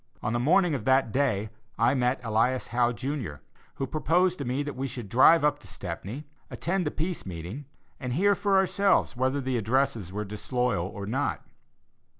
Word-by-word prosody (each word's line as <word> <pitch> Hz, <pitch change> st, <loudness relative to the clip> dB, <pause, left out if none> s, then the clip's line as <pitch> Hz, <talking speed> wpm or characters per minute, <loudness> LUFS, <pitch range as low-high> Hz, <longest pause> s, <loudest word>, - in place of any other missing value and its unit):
On 110 Hz, -, -1 dB
the 120 Hz, -, +1 dB
morning 170 Hz, +6 st, +3 dB
of 130 Hz, -6 st, -2 dB
that 130 Hz, -3 st, +3 dB
day, 110 Hz, -6 st, 0 dB, 0.3 s
I 115 Hz, +3 st, +3 dB
met 125 Hz, -1 st, +1 dB
Elias 115 Hz, +3 st, +1 dB
Howe, 120 Hz, 0 st, +2 dB
Jr., 130 Hz, -, -4 dB, 0.4 s
who 135 Hz, -, -2 dB
proposed 170 Hz, +5 st, +1 dB
to 140 Hz, -, -3 dB
me 130 Hz, +4 st, -1 dB
that 145 Hz, 0 st, -5 dB
we 135 Hz, +1 st, -2 dB
should 120 Hz, -4 st, -6 dB
drive 145 Hz, -, +6 dB
up 150 Hz, 0 st, +2 dB
to 105 Hz, -, -15 dB
Stepney, 100 Hz, -, -6 dB, 0.2 s
attend 180 Hz, -1 st, -1 dB
the -, -, +2 dB
Peace 170 Hz, +4 st, -3 dB
meeting, 90 Hz, -, -7 dB, 0.3 s
and 125 Hz, -3 st, -3 dB
hear 200 Hz, +8 st, +4 dB
for 200 Hz, -1 st, +2 dB
ourselves 190 Hz, -4 st, +2 dB
whether 130 Hz, +3 st, 0 dB
the 130 Hz, -2 st, -1 dB
addresses 115 Hz, -3 st, 0 dB
were 105 Hz, +2 st, -3 dB
disloyal 105 Hz, -2 st, -1 dB
or 100 Hz, 0 st, -7 dB
not. 130 Hz, +7 st, -2 dB
130 Hz, 180 wpm, -27 LUFS, 115-150 Hz, 0.4 s, drive